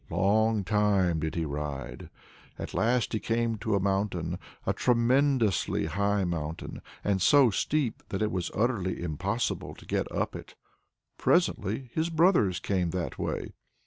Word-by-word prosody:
Long 110 +2 +2
time 100 -4 +2
did 80 0 -3
he 85 -1 -1
ride; 75 -1 -5 0.5
at - - -6
last 120 +1 +1
he 110 - +1
came 115 -1 -1
to 110 -1 0
a - - +2
mountain 95 -3 -1 0.3
a - - +1
tremendously 125 - +2
high 100 +4 0
mountain, 80 -3 -4 0.2
and 100 -2 +1
so 135 +4 +6
steep 140 +2 0
that 95 +2 -1
it 105 - 0
was 90 -2 -2
utterly 105 -5 0
impossible 80 -4 -2
to - - -15
get - - -2
up - - -2
it. - - -10 0.6
Presently 115 +6 +1
his 160 +1 0
brothers 160 - +3
came 90 -3 0
that 90 -2 -4
way. - - -3
100 Hz, 145 wpm, -28 LUFS, 90-115 Hz, 0.6 s, so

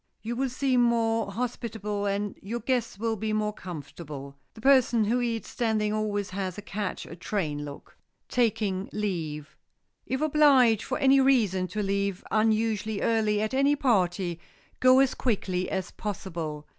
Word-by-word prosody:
You 235 +2 -3
will 265 +2 0
seem 255 0 +1
more 225 -3 +2
hospitable 210 -3 -3
and 200 0 -2
your 230 +5 -4
guest 250 -6 -1
will 225 +1 -1
be 215 +1 -2
more 210 0 0
comfortable. 145 -5 -8 0.2
The - - -12
person 250 -3 +4
who 240 +4 +1
eats 230 -2 -2
standing 215 -3 0
always 205 -2 -1
has 185 -1 -3
a 205 - -7
catch 200 0 -4
a - - -9
train 160 -5 -2
look. 145 -1 -10 0.3
[Sidenote: - - -53
TAKING 205 -5 0
LEAVE] 160 -8 -3 0.5
If 265 +2 -2
obliged 280 -7 +5
for 255 - -3
any 275 0 +5
reason 215 -9 +3
to 205 +4 -3
leave 200 -1 -1
unusually 220 -1 +1
early 215 -2 +2
at 215 - -2
any 275 +2 +3
party, 185 - +1 0.4
go 255 0 +6
as 270 -1 +4
quietly 190 -6 -1
as 190 -2 -3
possible. 170 -7 -5
215 Hz, 155 wpm, -27 LUFS, 190-235 Hz, 0.5 s, go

